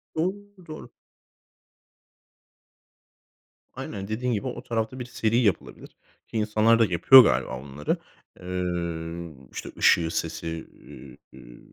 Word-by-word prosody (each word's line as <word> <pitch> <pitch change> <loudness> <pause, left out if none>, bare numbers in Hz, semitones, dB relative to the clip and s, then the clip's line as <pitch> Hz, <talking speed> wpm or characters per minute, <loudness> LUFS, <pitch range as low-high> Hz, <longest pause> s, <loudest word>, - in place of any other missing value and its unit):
Doğru, 170 +4 0 0.3
doğru. 155 0 -9 2.9
Aynen, 100 -1 -6
dediğin 120 +4 -2
gibi 105 +4 -2
o 125 -1 -6
tarafta 115 +2 -3
bir 125 - -5
seri 115 -1 0
yapılabilir 105 -7 -1 0.4
ki 115 - -5
insanlar 110 +2 +3
da 115 - +5
yapıyor 110 +8 +8
galiba 65 - 0
onları. 70 +2 -3 0.4
Iıı, 85 -2 -4 0.2
işte, - - -7
ışığı, 85 -1 +4
sesi, 80 0 -4 0.7
ııı, - - -14
100 Hz, 105 wpm, -25 LUFS, 85-120 Hz, 2.9 s, yapıyor